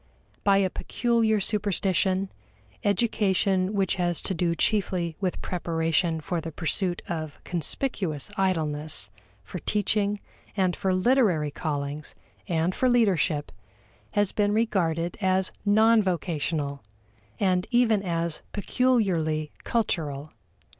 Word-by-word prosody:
By 200 -1 +4
a 190 -2 +2
peculiar 230 -3 +1
superstition, 195 -1 +1 0.5
education 195 -2 +1
which 195 -1 +1
has 175 -2 0
to 190 - -1
do 170 -1 0
chiefly 180 -5 0
with 185 -2 -2
preparation 165 -1 0
for 170 +2 -2
the 165 - -6
pursuit 175 +3 -1
of 155 -3 -5
conspicuous 175 - -2
idleness, 155 - +1 0.3
for 180 - -7
teaching, 210 +2 0 0.4
and 185 -2 +2
for 190 - 0
literary 185 - +2
callings, 145 -1 -4 0.3
and 170 +1 +1
for 255 - +1
leadership, 190 -11 +2 0.6
has 205 -2 +2
been 205 -1 +1
regarded 175 -6 0
as 190 -1 +2
non 220 +2 +5
vocational 160 -6 -2 0.6
and 185 -2 +1
even 235 -4 +3
as 170 -3 -2
peculiarly 190 -10 +1
cultural. 155 -10 -1
185 Hz, 110 wpm, -26 LUFS, 160-205 Hz, 0.6 s, non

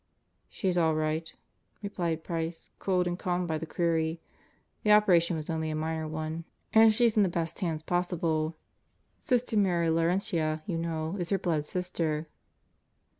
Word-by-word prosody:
"She's 185 -3 0
all 160 -2 +3
right," 155 +1 -1 0.5
replied 170 -5 -2
Price, 165 -1 -4
cooled 185 -2 +1
and 175 +1 -2
calmed 180 -1 -1
by 160 -1 -1
the 165 - -6
query. 165 -1 0 0.6
"The 210 - +3
operation 180 -5 +5
was 155 -1 -4
only 160 -1 -2
a 155 - -2
minor 160 0 -2
one 155 +1 -4 0.3
and 220 0 +8
she's 230 0 +3
in 215 - +5
the 195 - +3
best 170 -1 -3
hands 165 -5 -2
possible. 165 -2 0 0.7
Sister 250 -4 0
Mary 175 -5 +2
Laurentia, 165 -2 0
you 170 -4 -2
know, 165 +2 -2
is 175 -1 -2
her 195 - +2
blood 155 -5 -1
sister." 165 -4 -2
165 Hz, 155 wpm, -29 LUFS, 160-180 Hz, 0.7 s, and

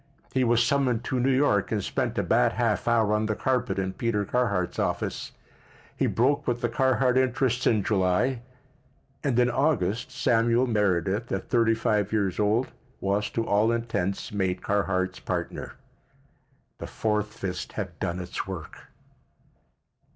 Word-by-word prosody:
He 130 - +2
was 120 0 +3
summoned 125 -3 +1
to 130 - -1
New 125 +2 +2
York 130 -8 +2
and 105 -3 0
spent - - -2
a - - +1
bad - - +3
half - - 0
hour 115 -3 +3
on 105 0 +1
the 110 - -1
carpet 125 -7 0
in 95 -1 -1
Peter 105 -3 -1
Carhart's 100 -7 0
office. - - -2 0.6
He - - +1
broke 140 +4 +1
with 120 0 0
the 120 - 0
Carhart 130 +1 +2
interests 130 0 +1
in 110 -3 +3
July, 105 +6 +1 0.8
and 135 -5 0
in 125 0 +3
August 120 - 0
Samuel 120 0 +2
Meredith, 105 -1 0
at 95 - -3
thirty 115 -2 +3
five 105 -2 0
years 100 -4 0
old, 110 +5 +1 0.3
was, 100 +2 0
to 115 - -2
all 105 +3 +3
intents, 115 -5 -2
made 95 -3 -1
Carhart's 95 -2 0
partner. - - -4 1.1
The - - -6
fourth 105 -1 -2
fist 90 -2 -5
had - - -5
done 85 +1 -2
its 90 +1 -5
work. 90 -5 -8
110 Hz, 150 wpm, -26 LUFS, 100-125 Hz, 1.1 s, was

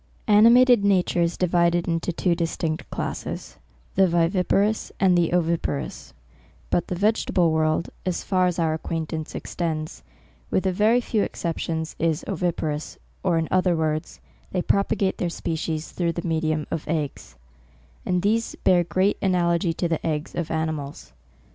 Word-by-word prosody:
Animated 235 +2 +6
nature 185 -3 +2
is 170 0 0
divided 175 -1 +2
into 165 +1 -1
two 175 +1 +1
dis 170 -1 -2
tinct 160 -1 -3
classes, - - -5 0.4
the 190 -1 +4
viviparous, 180 +5 +1
and 185 -2 +4 0.2
oviparous: 160 - -2 0.6
but 175 - +1
the 180 - -3
vegetable 190 -3 +2
world, 155 +1 +1
as 185 -2 -2
far 185 -2 +2
as 180 - -1
our 165 -2 +1
ac 160 - -4
quaintance 160 -1 -4
extends, 160 -3 -4 0.5
with 190 - 0
a 190 - +2
very 215 +6 +3
few 220 -3 0
excep 170 -4 -3
tions, 160 -1 -3
is 165 -1 0
oviparous, 160 -4 -2 0.2
or 180 -3 +1
in 165 -1 0
other 185 -1 +3
words, 155 0 -2 0.3
they 180 -2 -1
propagate 200 -1 +1
their 175 - 0
species 160 -1 -3
through 170 -2 -1
the 170 +1 -4
medium 155 -2 0
of 160 - -3
eggs; 150 - -3 0.7
and 180 0 0
these 225 +3 +1
bear 175 -1 +4
great 185 +4 +1
analogy 175 -2 +2
to 170 +1 -1
the 165 -2 -2
eggs 155 -1 -2
of 170 -2 -3
animals. 155 - -4
170 Hz, 155 wpm, -24 LUFS, 160-185 Hz, 0.7 s, Animated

